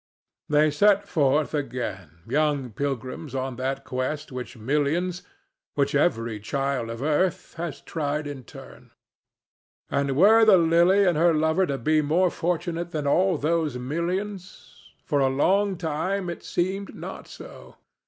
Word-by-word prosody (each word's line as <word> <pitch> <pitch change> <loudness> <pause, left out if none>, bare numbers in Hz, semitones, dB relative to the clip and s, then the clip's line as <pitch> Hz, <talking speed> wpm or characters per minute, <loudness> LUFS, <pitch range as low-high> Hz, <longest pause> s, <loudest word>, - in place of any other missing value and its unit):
They 150 0 +4
set 205 +6 +3
forth 145 -2 +1
again, 100 - -4
young 145 -1 0
pilgrims 135 +2 -4
on 130 -1 -3
that 135 +1 -3
quest 135 +4 -3
which 125 -1 -7
millions—which 150 +2 -2
every 115 -7 +1
child 135 +1 -2
of 115 +3 -5
earth—has 170 0 -1
tried 150 -1 -3
in 145 -3 -7
turn. - - -13 1.0
And 140 -1 0
were 220 +6 +7
the 215 -4 +7
Lily 170 +4 +4
and 175 -4 +2
her 170 -1 +4
lover 160 +4 +2
to 140 - -2
be 155 +5 +2
more 170 +5 +2
fortunate 170 0 -2
than 155 -4 -3
all 180 +4 +3
those 155 -2 0
millions? 180 +8 -5 0.2
For 145 -5 +1
a 135 - +3
long 190 +8 +2
time 180 +3 -2
it 170 - -8
seemed 190 +3 -2
not - - -8
so. - - -12
150 Hz, 135 wpm, -25 LUFS, 135-175 Hz, 1.0 s, were